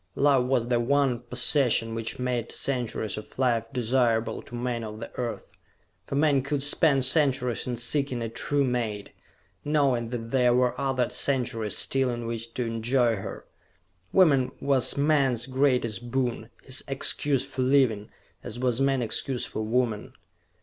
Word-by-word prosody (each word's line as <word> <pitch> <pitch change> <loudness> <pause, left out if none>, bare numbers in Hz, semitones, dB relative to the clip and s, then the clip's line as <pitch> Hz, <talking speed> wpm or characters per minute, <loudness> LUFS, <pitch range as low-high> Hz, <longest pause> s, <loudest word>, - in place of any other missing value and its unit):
Love 135 -3 +3
was 125 -3 +1
the 120 -1 +2
one 135 0 +2
possession 120 -1 +1
which 115 0 -4
made 125 -2 -2
centuries 120 -5 -2
of 105 - -13
life 115 -3 +1
desirable 120 -2 +1
to 120 - -11
men 120 -1 -2
of 110 0 -7
the 115 - -8
Earth. 120 -2 -4 0.6
For - - -3
men 145 -2 +3
could 140 +1 -1
spend 145 -2 +3
centuries 130 -4 +1
in 120 -1 -2
seeking 125 +1 -2
a - - -2
true 140 +5 -1
mate, 115 -5 -2 0.5
knowing 135 -6 +1
that 115 -2 -5
there 125 -2 +3
were 125 0 +2
other 130 -3 +1
centuries 120 -6 -1
still 135 -1 +1
in 120 -1 -4
which 115 0 -5
to 125 - -1
enjoy 115 +1 +1
her. 95 - -7 0.7
Woman 140 -9 +4
was 135 -2 +1
man's 140 -5 +2
greatest 125 -4 0
boon, 120 -3 -2
his 130 -1 -4
excuse 135 0 +1
for 130 - -4
living, 125 -6 +2 0.3
as 115 - -7
was 125 0 0
man 135 -2 +2
excuse 125 +3 -1
for - - -5
woman. 110 -1 -1
125 Hz, 155 wpm, -26 LUFS, 115-135 Hz, 0.7 s, Woman